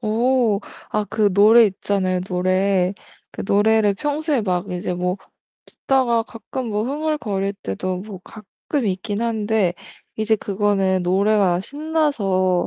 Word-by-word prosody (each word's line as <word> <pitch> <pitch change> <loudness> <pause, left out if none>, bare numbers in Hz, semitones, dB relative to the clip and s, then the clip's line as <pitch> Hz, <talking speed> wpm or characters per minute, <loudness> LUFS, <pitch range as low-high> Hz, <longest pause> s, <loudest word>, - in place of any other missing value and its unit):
어. 230 0 +2 0.3
아 210 0 0
그 210 -2 +1
노래 220 +4 +7
있잖아요, 190 -2 -1
노래. 185 +1 +1 0.4
그 - - -7
노래를 210 0 +3
평소에 295 +3 -1
막 185 -1 -2
이제 180 0 -3
뭐 180 +1 -1 0.5
듣다가 250 -4 +1
가끔 230 +3 -7
뭐 210 0 -1
흥얼거릴 255 -9 -2
때도 180 - -3
뭐 195 -1 -9
가끔 220 +5 -5
있기는 205 +3 -2
한데 215 -5 0 0.4
이제 220 0 +1
그거는 195 -2 0
노래가 190 0 +2
신나서 230 - 0
205 Hz, 250 characters per minute, -21 LUFS, 185-230 Hz, 0.5 s, 노래